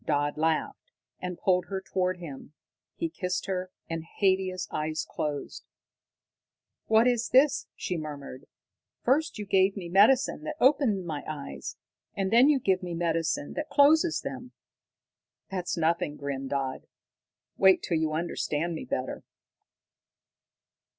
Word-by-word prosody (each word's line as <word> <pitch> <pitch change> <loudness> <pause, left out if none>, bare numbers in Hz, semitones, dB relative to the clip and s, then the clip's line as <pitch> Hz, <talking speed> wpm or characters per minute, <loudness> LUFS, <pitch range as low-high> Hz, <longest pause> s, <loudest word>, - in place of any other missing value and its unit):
Dodd 145 -1 0
laughed, 160 - -1 0.3
and 180 -1 -5
pulled 180 -1 +2
her 195 -1 -3
toward 185 -1 -1
him. 150 -4 -9 0.4
He 335 - -1
kissed 185 - -3
her, 185 -1 -3 0.2
and 165 -1 -4
Haidia's 185 +1 0
eyes 155 +1 -2
closed. 145 -2 -4 1.2
"What 225 +2 +5
is 240 -1 +1
this?" 265 +1 +4
she 180 - -3
murmured. 145 -3 -7 0.6
"First 300 +4 +2
you 210 - -5
give 195 0 +3
me 175 -3 -6
medicine 220 - +4
that 310 0 -4
opens 250 -8 +3
my 155 -4 -4
eyes, 150 -3 -6 0.4
and 195 -1 -1
then 250 +5 +7
you 290 -3 +4
give 190 -6 +1
me 175 -2 -4
medicine 165 -3 -1
that 300 0 -4
closes 315 +3 +4
them." 260 -2 -7 1.0
"That's 180 -2 -2
nothing," 160 -2 +1
grinned 135 -1 -4
Dodd. 135 -2 -3 0.7
"Wait 190 -1 +5
till 170 - 0
you 160 -1 0
understand 165 0 -1
me 160 - -5
better." 130 0 -3
180 Hz, 135 wpm, -28 LUFS, 155-220 Hz, 1.2 s, then